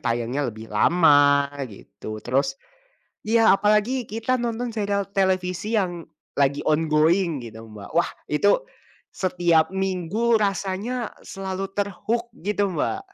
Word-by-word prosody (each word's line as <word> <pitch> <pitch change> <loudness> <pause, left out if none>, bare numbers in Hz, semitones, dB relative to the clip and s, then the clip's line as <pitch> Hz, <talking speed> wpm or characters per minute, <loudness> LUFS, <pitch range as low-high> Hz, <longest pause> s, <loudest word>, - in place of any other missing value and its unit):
tayangnya 120 +2 -1
lebih 110 0 -9
lama 145 +1 +4 0.2
gitu, 110 +1 -9
terus 135 +2 0 0.7
iya 225 +1 +5
apalagi 210 +5 +2
kita 225 +4 0
nonton 235 0 -2
serial 200 -2 -1
televisi 190 +2 0
yang 175 -3 -2 0.3
lagi 140 0 +2
ongoing 155 +1 +2
gitu, 110 0 -10
Mbak. 105 -2 -10
Wah, 170 - +3 0.2
itu 200 - +2 0.5
setiap 175 -4 +2
minggu 190 +4 0
rasanya 200 +5 -2
selalu 195 0 -5
ter-hook 210 +4 -2
gitu, 205 +2 -1
Mbak. 185 - -2
185 Hz, 115 wpm, -24 LUFS, 145-210 Hz, 0.7 s, iya